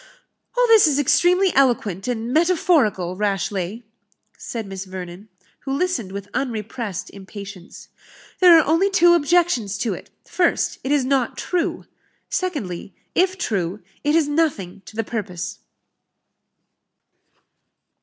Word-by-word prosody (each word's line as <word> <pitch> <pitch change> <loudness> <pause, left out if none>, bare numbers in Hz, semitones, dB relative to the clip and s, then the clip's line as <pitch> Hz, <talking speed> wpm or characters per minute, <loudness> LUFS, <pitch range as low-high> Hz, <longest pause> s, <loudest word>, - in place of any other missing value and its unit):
"All - - +5
this 450 -6 +6
is 285 -2 +2
extremely 355 +6 +3
eloquent 230 -8 +1
and 240 0 -2
metaphorical, 310 - +2
Rashleigh," 200 +1 -2 0.5
said 230 -2 -6
Miss 195 -1 -7
Vernon, 185 +2 -8 0.3
who 270 - -6
listened 275 - -1
with 200 0 -6
unrepressed 225 -5 -4
impatience; 200 -1 -11 0.5
"there 355 -3 +8
are 320 - +4
only 330 +6 +3
two 345 -3 +5
objections 330 - +2
to 225 - -1
it: - - -10 0.2
first, 350 -2 0
it 265 - -2
is 290 -3 +2
not 260 -2 0
true; 355 -2 -2 0.5
secondly, 215 - -3 0.2
if 375 +1 +2
true, 195 - -2 0.2
it 295 +1 +2
is 325 -3 +3
nothing 290 - -1
to - - -12
the 225 - -1
purpose." 205 -6 -5
240 Hz, 125 wpm, -22 LUFS, 200-330 Hz, 0.5 s, there